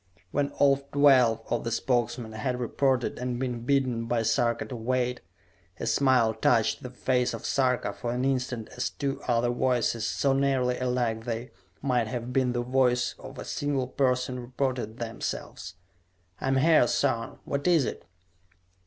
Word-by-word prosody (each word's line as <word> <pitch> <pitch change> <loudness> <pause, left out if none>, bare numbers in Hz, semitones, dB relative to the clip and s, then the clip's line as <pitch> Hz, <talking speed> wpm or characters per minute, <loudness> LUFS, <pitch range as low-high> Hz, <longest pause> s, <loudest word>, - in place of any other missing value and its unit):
When 140 0 0
all 140 -1 +4
twelve 130 -6 +5
of 120 - 0
the 115 - -2
Spokesmen 120 -1 -1
had 125 +3 -3
reported 125 +1 0
and 125 -1 -2
been 125 -2 -2
bidden 130 -5 +1
by 115 -1 +1
Sarka 115 +1 +1
to 130 - -7
wait, 125 +1 -1 0.6
a - - -3
smile 130 -5 +3
touched 110 -1 +2
the 125 - -6
face 125 0 0
of - - -9
Sarka 125 -6 +1
for 120 - -4
an 125 +2 -1
instant 125 -4 -1
as 125 - -3
two 140 -1 -3
other 120 0 +2
voices, 120 -2 0
so 135 -1 +1
nearly 135 -2 +1
alike 120 -3 -1
they 120 +1 -4 0.3
might 125 -5 +1
have 120 +1 -4
been 130 -2 +2
the 120 0 -1
voice 125 -1 +2
of - - -10
a - - -6
single 140 -3 -2
person, 125 -1 0
reported 125 -2 -3
themselves. 110 -5 -5 0.6
"I - - -3
am 135 0 +2
here, 155 -2 +5
son! 115 0 0
What 140 +3 -2
is 165 -6 +4
it?" - - -5
125 Hz, 160 wpm, -27 LUFS, 120-130 Hz, 0.6 s, twelve